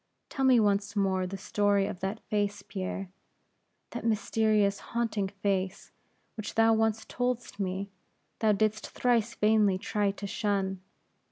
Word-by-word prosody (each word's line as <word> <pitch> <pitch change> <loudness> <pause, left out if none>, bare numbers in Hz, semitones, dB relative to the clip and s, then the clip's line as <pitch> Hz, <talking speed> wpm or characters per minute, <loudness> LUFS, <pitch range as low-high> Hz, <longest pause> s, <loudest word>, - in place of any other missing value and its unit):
Tell 270 - -2
me 255 -2 +6
once 205 -1 +1
more 190 -2 +1
the 195 +2 -5
story 205 0 +1
of 185 - -5
that 195 +4 -3
face, 205 -1 -1
Pierre, 190 -1 -5 0.8
that - - -5
mysterious, 215 -2 +2
haunting 225 -4 -1
face, 195 -1 -2 0.4
which 215 -2 -6
thou 225 0 +5
once 220 0 +1
told'st 245 -4 -3
me, 195 +1 -2 0.5
thou 220 -1 +4
didst 215 +1 0
thrice 240 0 +1
vainly 210 -3 +3
try 205 +1 0
to 200 +1 -5
shun. 195 -2 -1
205 Hz, 140 wpm, -29 LUFS, 195-220 Hz, 0.8 s, me